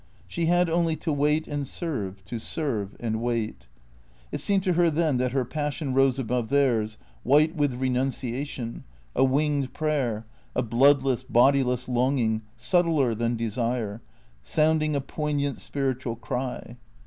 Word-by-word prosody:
She 170 -1 -1
had 175 +1 +3
only 165 -1 +1
to 160 -1 -2
wait 150 +2 +1
and 145 -2 -3
serve; 100 - -4
to 115 +2 -5
serve 110 - -2
and 110 -1 -2
wait. 110 - -2 0.6
It - - -3
seemed 195 -2 +2
to 185 -2 +2
her 170 0 +4
then 155 -3 +1
that 125 0 0
her 130 -1 0
passion 145 +1 -3
rose 135 -1 +3
above 125 -2 -1
theirs, 120 -6 +2 0.2
white 155 +5 +4
with 145 -5 +1
renunciation, 130 -1 -2 0.3
a - - +4
winged 140 0 +1
prayer, 135 -8 -1 0.3
a 125 - +1
bloodless, 130 +2 +3
bodiless 125 0 +3
longing, 125 -3 +1 0.2
subtler 160 -4 +2
than 115 +2 -1
desire. 115 -1 -2 0.6
Bounding 155 -1 +3
a 140 - 0
poignant 145 -1 -2
spiritual 130 -4 -2
cry. 125 0 -5
135 Hz, 140 wpm, -26 LUFS, 120-150 Hz, 0.6 s, her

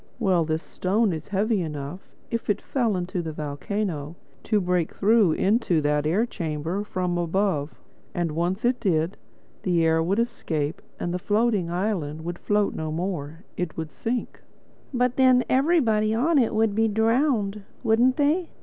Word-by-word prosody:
"Well, 185 -8 +2
this 160 +1 -1
stone 200 +2 0
is 160 - -6
heavy 205 +1 +1
enough, 150 +2 -6 0.2
if 230 -2 -3
it 205 0 +2
fell 235 -7 0
into 180 +1 -2
the 160 -2 -4
volcano, 155 +1 -3 0.3
to 215 -2 +1
break 180 -3 0
through 210 -4 +4
into 200 -4 +2
that 150 0 +1
air 195 +9 +2
chamber 165 -2 -3
from 180 -3 -2
above. 170 -3 -1 0.4
And 175 -2 0
once 175 +7 -1
it 245 +1 +2
did, 165 -2 +1 0.5
the 175 -3 +2
air 160 0 +3
would 185 +5 0
escape 165 -10 -2 0.2
and 175 - -2
the 180 - -1
floating 210 -2 +1
island 175 -5 -2
would 175 0 -4
float 205 -1 +1
no 155 -1 -4
more. 165 -1 -4
It 180 -3 -3
would 160 -1 -4
sink." 235 +1 -3 0.5
"But 250 -1 +1
then 255 -1 +5
everybody 245 -7 +3
on 295 +6 +3
it 235 -4 +1
would 220 -1 +2
be 225 +2 +2
drowned, 220 -1 +1 0.2
wouldn't 240 +3 +3
they?" 310 +4 +2
195 Hz, 160 wpm, -25 LUFS, 165-225 Hz, 0.5 s, then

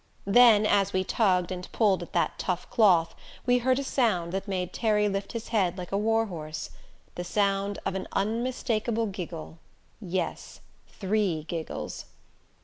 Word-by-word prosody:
Then, 215 0 +6
as 200 -2 +2
we 185 0 +1
tugged 185 -4 +1
and 180 0 -6
pulled 200 -5 +3
at 175 - -8
that - - 0
tough 180 -1 -2
cloth 175 -7 +4 0.3
we 250 0 +4
heard 255 +1 +2
a 275 - -1
sound 215 -11 +1
that 195 +2 -3
made 185 -2 -3
Terry 210 -2 +2
lift 195 0 -3
his 230 -1 -5
head 190 -5 +1
like 180 -1 -7
a 195 - +1
war 225 +1 +2
horse 155 -6 -6 0.4
the 175 - -5
sound 200 +1 0
of 195 - -1
an 190 0 -4
unmistakable 230 +1 -1
giggle, 175 -5 -7 0.4
yes 185 -2 -4 0.3
three 195 -5 -1
giggles. 165 0 -5
195 Hz, 155 wpm, -27 LUFS, 180-220 Hz, 0.4 s, Then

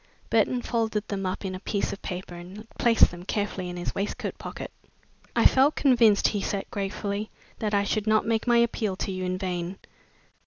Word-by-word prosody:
Burton 250 -1 +2
folded 220 -3 -1
them 195 -2 -2
up 185 +2 -3
in 190 - -3
a 185 - -5
piece 200 +1 -1
of 195 - -9
paper 180 0 -5
and 185 +5 -10
placed 230 -1 +5
them 175 0 -9
carefully 195 -2 -2
in 180 - -6
his 175 - -3
waistcoat 200 +2 -3
pocket. - - -7 0.6
"I - - +3
felt 275 +3 +5
convinced," 235 -7 +5
he 205 - -2
said 200 0 -2
gratefully, 200 +1 -3 0.3
"that 210 -1 0
I 200 - +3
should 215 +1 -1
not 215 0 +3
make 225 +1 0
my 240 -1 +5
appeal 225 -4 +1
to 195 - -3
you 185 0 -3
in 180 0 -1
vain. 180 -1 -3
200 Hz, 195 wpm, -27 LUFS, 185-220 Hz, 0.6 s, placed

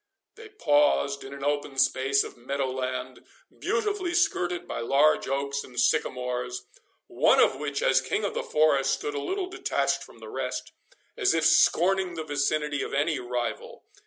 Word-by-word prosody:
They 445 -1 -13
paused 145 - +2
in 135 - -9
an 140 0 -8
open 145 -1 -2
space 135 +1 +2
of - - -9
meadow 130 +2 -3
land, 130 0 -4 0.4
beautifully 410 -6 -1
skirted 180 - 0
by - - -4
large 140 +6 +3
oaks 140 +1 -2
and 125 -2 -7
sycamores, 125 0 -1 0.4
one - - +3
of 130 - +4
which, 145 -1 -3
as 135 0 +4
king 210 - -2
of 205 - -1
the - - -2
forest, 145 -3 +2
stood 145 - -3
a 145 - -3
little 380 - -2
detached 370 0 -1
from - - -15
the - - -11
rest, - - -4 0.4
as 410 -5 +2
if 160 -1 +1
scorning 180 +3 +3
the 160 - -4
vicinity 145 0 -1
of - - -4
any 150 0 +1
rival. 120 -1 -4
145 Hz, 165 wpm, -27 LUFS, 135-170 Hz, 0.4 s, of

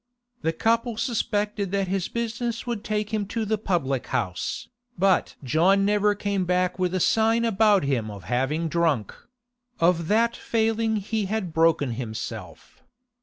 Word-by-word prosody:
The 160 - +1
couple 230 +6 0
suspected 210 -4 -1
that 195 -1 +1
his 190 -1 -1
business 235 0 -3
would 235 -3 -3
take 215 0 -2
him 210 -2 -1
to 225 +1 -2
the 215 0 0
public 140 - -1
house, 90 -5 -2 0.3
but 190 0 +2
John 175 +9 +3
never 205 0 +2
came 200 -2 -1
back 180 +1 0
with 180 0 0
a - - +1
sign 225 +4 +3
about 210 -3 +4
him 125 -6 0
of 100 -3 -9
having 135 - 0
drunk; 160 - 0 0.7
of 170 -1 +2
that 230 +4 +2
failing 225 0 0
he 215 +1 -2
had 195 -4 -3
broken 160 -5 +3
himself. 115 -2 -7
195 Hz, 150 wpm, -25 LUFS, 165-220 Hz, 0.7 s, about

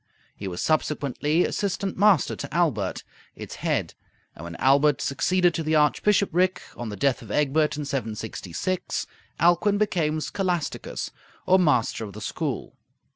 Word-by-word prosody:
He 100 - -6
was 90 -2 -4
subsequently 150 +1 +1
assistant 195 -1 -2
master 200 -5 +4
to 140 - -6
Aelbert, 135 - 0 0.3
its - - -8
head; - - -1 0.4
and 75 - -11
when 85 0 -7
Aelbert 140 +1 +4
succeeded 175 +6 +2
to 165 - -2
the 155 0 0
archbishopric, 185 +4 +2 0.2
on 120 -2 -5
the 105 - -5
death 135 +5 +1
of - - -12
Egbert 150 +1 +1
in 150 - -3
766, 110 - -3 0.3
Alcuin 175 +5 +3
became 165 -7 0
scholasticus 180 -1 -3 0.3
or 185 +1 +5
master 125 -9 +2
of 100 -2 -7
the - - -8
school. - - -3
155 Hz, 140 wpm, -25 LUFS, 135-180 Hz, 0.4 s, or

